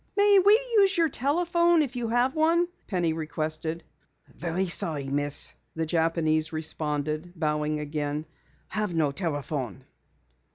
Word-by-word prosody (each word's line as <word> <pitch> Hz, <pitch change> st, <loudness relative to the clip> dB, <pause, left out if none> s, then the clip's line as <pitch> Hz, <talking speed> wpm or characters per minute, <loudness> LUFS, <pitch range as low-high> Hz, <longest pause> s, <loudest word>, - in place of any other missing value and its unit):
"May 405 Hz, -1 st, +6 dB
we 400 Hz, +3 st, +6 dB, 0.2 s
use 390 Hz, -2 st, +4 dB
your 330 Hz, -2 st, +3 dB
telephone 340 Hz, -, +2 dB
if 270 Hz, -3 st, -6 dB
you 240 Hz, -2 st, -2 dB
have 245 Hz, +3 st, +2 dB
one?" 330 Hz, +2 st, +2 dB, 0.2 s
Penny 175 Hz, -5 st, 0 dB
requested. 160 Hz, +1 st, -3 dB, 0.4 s
"So -, -, -24 dB
very 175 Hz, +3 st, -2 dB
sorry, 155 Hz, -5 st, +2 dB
Miss," 145 Hz, +1 st, -1 dB, 0.2 s
the 160 Hz, 0 st, -1 dB
Japanese 160 Hz, -1 st, +1 dB
responded, 155 Hz, +1 st, -2 dB
bowing 150 Hz, -2 st, -1 dB
again. 150 Hz, 0 st, -3 dB, 0.4 s
"Have 210 Hz, -5 st, -2 dB
no 155 Hz, -3 st, +2 dB
telephone." 145 Hz, -, -4 dB
165 Hz, 130 wpm, -26 LUFS, 150-255 Hz, 0.4 s, May